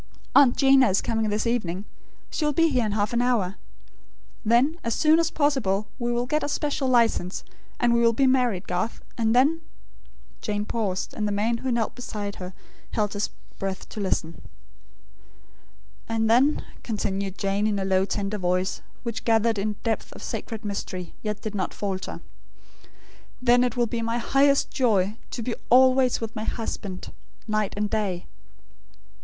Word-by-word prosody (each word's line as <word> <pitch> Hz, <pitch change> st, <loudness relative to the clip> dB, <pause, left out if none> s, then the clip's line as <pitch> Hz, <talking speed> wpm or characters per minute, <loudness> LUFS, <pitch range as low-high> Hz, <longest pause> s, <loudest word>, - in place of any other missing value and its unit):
Aunt 275 Hz, -4 st, +6 dB
'Gina 270 Hz, -3 st, +6 dB
is 190 Hz, -, +3 dB
coming 220 Hz, -1 st, 0 dB
this 210 Hz, +2 st, 0 dB
evening. 205 Hz, -5 st, -1 dB, 0.5 s
She -, -, -2 dB
will 300 Hz, 0 st, +2 dB
be 330 Hz, +3 st, +4 dB
here 250 Hz, -6 st, +1 dB
in 205 Hz, -, -2 dB
half 205 Hz, +1 st, 0 dB
an 240 Hz, -, +2 dB
hour. 220 Hz, -6 st, +1 dB, 0.9 s
Then, 250 Hz, +9 st, +3 dB
as 230 Hz, -1 st, 0 dB
soon 315 Hz, +1 st, +5 dB
as 330 Hz, -, +2 dB
possible 215 Hz, -9 st, +1 dB
we 240 Hz, 0 st, -1 dB
will 240 Hz, +1 st, 0 dB
get 300 Hz, +5 st, 0 dB
a 290 Hz, -, -2 dB
special 290 Hz, -2 st, -1 dB
license; 230 Hz, -7 st, +2 dB, 0.4 s
and 240 Hz, -1 st, +3 dB
we 235 Hz, -, +3 dB
will 230 Hz, 0 st, +5 dB
be 270 Hz, +4 st, +2 dB
married, 250 Hz, -8 st, +2 dB
Garth; 180 Hz, +6 st, -2 dB
and 225 Hz, 0 st, +1 dB
then 295 Hz, +6 st, +4 dB, 0.4 s
" -, -, -29 dB
Jane 210 Hz, -1 st, -2 dB
paused; 205 Hz, -5 st, -2 dB
and 210 Hz, -, -2 dB
the -, -, -1 dB
man 220 Hz, +3 st, 0 dB
who 260 Hz, +1 st, -2 dB
knelt 235 Hz, -2 st, 0 dB
beside 210 Hz, -5 st, -5 dB
her, 180 Hz, 0 st, -7 dB, 0.4 s
held 210 Hz, -2 st, 0 dB
his 205 Hz, 0 st, -1 dB, 0.3 s
breath 195 Hz, -1 st, -4 dB
to -, -, -7 dB
listen 165 Hz, -4 st, -2 dB, 1.7 s
"and 225 Hz, -1 st, +1 dB
then," 255 Hz, +7 st, +3 dB, 0.2 s
continued 200 Hz, -3 st, -2 dB
Jane 200 Hz, +2 st, 0 dB
in 210 Hz, -1 st, 0 dB
a 195 Hz, -, -1 dB
low 190 Hz, 0 st, +3 dB
tender 200 Hz, +1 st, -2 dB
voice, 180 Hz, +1 st, 0 dB, 0.2 s
which 235 Hz, -2 st, -4 dB
gathered 225 Hz, -1 st, +2 dB
in 210 Hz, +1 st, -1 dB
depth 225 Hz, -1 st, -1 dB
of -, -, -11 dB
sacred 225 Hz, -1 st, -5 dB
mystery, 185 Hz, -3 st, -4 dB
yet 210 Hz, -1 st, -3 dB
did 215 Hz, -, -4 dB
not 190 Hz, -3 st, -2 dB
falter 190 Hz, -2 st, -4 dB, 1.2 s
"then 245 Hz, 0 st, +4 dB
it 250 Hz, -1 st, -1 dB
will 240 Hz, -, +3 dB
be 230 Hz, 0 st, -3 dB
my 230 Hz, +1 st, -1 dB
highest 275 Hz, +3 st, +3 dB
joy, 210 Hz, -5 st, +2 dB
to 235 Hz, -, -4 dB
be 240 Hz, -, -2 dB, 0.2 s
always 255 Hz, 0 st, +5 dB
with 225 Hz, 0 st, -5 dB
my 215 Hz, -, -3 dB
husband, 200 Hz, -4 st, -5 dB, 0.3 s
night 215 Hz, -2 st, 0 dB
and 210 Hz, 0 st, -1 dB
day." 195 Hz, -5 st, -1 dB
225 Hz, 170 wpm, -25 LUFS, 200-245 Hz, 1.7 s, Aunt